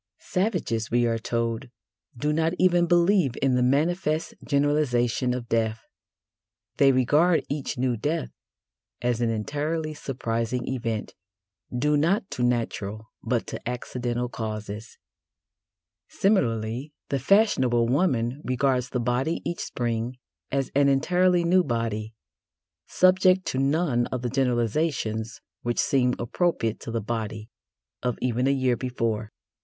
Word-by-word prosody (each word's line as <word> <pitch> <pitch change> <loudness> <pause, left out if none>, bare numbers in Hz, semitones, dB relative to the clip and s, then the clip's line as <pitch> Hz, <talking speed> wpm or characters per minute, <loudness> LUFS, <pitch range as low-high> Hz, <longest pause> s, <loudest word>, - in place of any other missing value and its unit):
Savages, 180 - -1
we 120 0 +2
are 115 -1 0
told, 115 +2 -2 0.5
do 150 +5 0
not 160 +2 +1
even 175 -1 +4
believe 175 - +3
in 135 -1 +2
the 125 - +2
manifest 155 +5 +1
generalisation 140 -4 +1
of 125 -1 -3
death: 110 -1 0 0.9
they 140 -1 +6
regard 150 +7 +3
each 145 -3 -3
new 125 -1 +1
death 150 +8 -2 0.7
as 120 -1 0
an 120 - +2
entirely 150 +8 -2
surprising 120 -4 -3
event, 115 -4 -3 0.6
due 150 +5 +1
not 180 +8 +2
to - - -4
natural, 110 -3 -1
but - - -1
to - - -5
accidental 125 0 -3
causes. 110 -2 -6 1.1
Similarly, 125 - 0 0.2
the 140 - 0
fashionable 130 - +3
woman 130 -2 +1
regards 125 0 +1
the 125 - -2
body 125 +7 0
each 170 - -3
Spring 120 +1 -2 0.3
as 135 -2 -1
an 140 0 +4
entirely 180 +6 +3
new 180 +2 +4
body, 115 -4 -2 0.7
subject 185 0 +4
to 130 - -1
none 135 -3 +1
of 125 -1 -4
the 120 - -1
generalisations 120 -3 0 0.2
which 120 0 -2
seemed 125 -2 +2
appropriate 120 - 0
to - - -8
the 115 0 -2
body 110 0 -4 0.5
of 125 -2 -1
even 125 +1 0
a - - +4
year 130 -3 +2
before. 115 -4 -2
125 Hz, 130 wpm, -26 LUFS, 115-150 Hz, 1.1 s, they